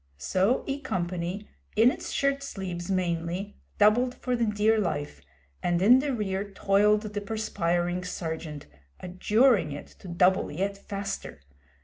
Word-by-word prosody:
So 190 - +1
E 275 0 -3
Company, 185 -4 -3 0.3
in 225 +4 +6
its - - -6
shirt 275 0 +1
sleeves 185 -9 -5
mainly, 180 +1 -2 0.2
doubled 240 +5 +4
for 250 0 -2
the 235 -1 +1
dear 210 +1 +2
life, 150 -7 -3 0.4
and 175 -1 +1
in 235 +8 +7
the 285 +1 -1
rear 200 -4 -2
toiled 205 +2 +3
the 205 -1 -4
perspiring 180 -4 -1
Sergeant, 160 -4 -5 0.3
adjuring 205 - +2
it 145 - -7
to - - -11
double 180 +2 +2
yet 195 +6 -2
faster. 195 - -6
195 Hz, 135 wpm, -27 LUFS, 175-215 Hz, 0.4 s, in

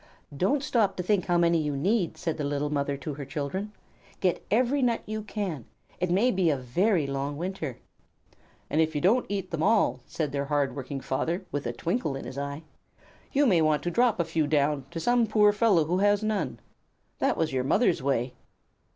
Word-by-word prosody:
"Don't 265 - +1
stop 225 -8 +1
to 180 - -2
think 200 0 +1
how 175 -1 +3
many 170 -1 +3
you 150 -2 -2
need," 190 +3 0
said 165 - -3
the - - -1
little 145 +1 -1
mother 140 -1 -1
to 145 +2 -5
her 140 +1 -6
children. 145 +9 -4 0.5
"Get 185 -2 0
every 255 +5 +2
nut 240 -2 +1
you 215 0 -4
can. 200 - -4 0.3
It 180 0 0
may 205 +8 +3
be 185 -5 +2
a 145 - +1
very 165 - +1
long 140 +1 -3
winter." 170 -6 -4 0.9
"And 155 - +1
if 160 -1 0
you - - +1
don't 225 +8 +3
eat 195 -2 -3
them 165 -2 -2
all," 215 +5 +3
said 150 -4 -3
their 140 0 -2
hard 145 -1 0
working 135 0 -5
father 170 +9 -2
with 145 -3 -3
a - - -1
twinkle 170 - -2
in 135 - -6
his 135 - -6
eyes, 140 +2 -5 0.7
"you 290 +1 +3
may 185 -10 +4
want 155 -2 +2
to 175 - -1
drop 240 0 +2
a 170 - +2
few 160 -2 0
down 145 -2 +1
to 170 - -5
some 240 +4 +2
poor 210 -1 +4
fellow 205 -7 +3
who 180 +4 0
has 205 +1 +3
none. 215 -1 -1 0.6
That - - +1
was 160 -3 0
your 130 -1 0
mother's 170 - +2
way." 130 -2 0
165 Hz, 205 wpm, -27 LUFS, 145-205 Hz, 0.9 s, may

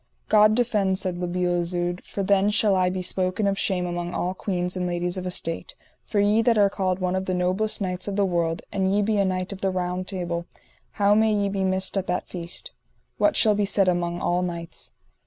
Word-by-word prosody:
God 215 0 +6
defend, 205 -5 +1
said 185 -2 -1
La 180 - -2
Beale 175 0 0
Isoud, 175 +1 -2
for 200 - -4
then 200 +1 +3
shall 210 -1 +2
I 185 -1 +2
be 185 0 -3
spoken 185 +3 0
of 195 0 0
shame 180 -3 0
among 175 0 -4
all 180 +1 -1
queens 180 -2 -2
and 180 -1 -1
ladies 175 +1 -1
of 185 -1 -4
estate; 180 - -4 0.3
for 210 - -2
ye 205 +2 +4
that 230 0 +3
are 200 -1 +4
called 185 -2 0
one 185 -1 -1
of 190 0 -2
the 185 - -1
noblest 185 +4 0
knights 180 -1 -2
of 200 - -2
the 200 -1 +2
world, 170 -2 -1
and 190 -1 0 0.2
ye 220 -1 +2
a - - +4
knight 185 +1 -2
of 190 - -10
the 195 - +1
Round 185 0 -2
Table, 175 -3 -3 0.5
how 205 -1 +3
may 220 +1 +4
ye 205 -1 +1
be 195 -1 -1
missed 190 +1 0
at 190 - -1
that 180 - -2
feast? 180 - -5 0.5
What 310 - +3
shall 215 -2 +4
be 205 0 +1
said 195 -1 +3
among 175 -1 0
all 175 +1 +1
knights? 170 -2 -5
185 Hz, 225 wpm, -24 LUFS, 180-200 Hz, 0.5 s, God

